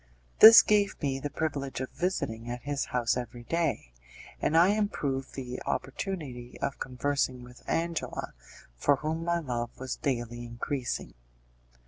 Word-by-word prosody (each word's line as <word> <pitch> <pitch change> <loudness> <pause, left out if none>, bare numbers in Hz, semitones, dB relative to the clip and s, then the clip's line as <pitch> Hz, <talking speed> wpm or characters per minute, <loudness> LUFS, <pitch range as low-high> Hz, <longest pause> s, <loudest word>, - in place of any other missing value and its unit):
This 220 0 +12
gave 205 -1 +2
me 135 -2 -1
the 145 - -4
privilege 140 -3 -3
of 130 - -4
visiting 120 -10 -2
at 120 0 -5
his 145 0 -2
house 120 -2 0
every 120 -1 -5
day, 165 - -1 0.5
and 160 - +2
I 175 +3 +7
improved 150 -11 -1
the 125 -2 -5
opportunity 135 -6 -4
of 140 - -3
conversing 130 0 -1
with 125 0 -14
Angela, 165 0 -2 0.4
for 140 - +3
whom 155 +3 -3
my 170 0 +2
love 120 -7 -3
was 130 -1 -4
daily 120 -3 -2
increasing. 120 +2 -4
135 Hz, 140 wpm, -29 LUFS, 125-165 Hz, 0.5 s, This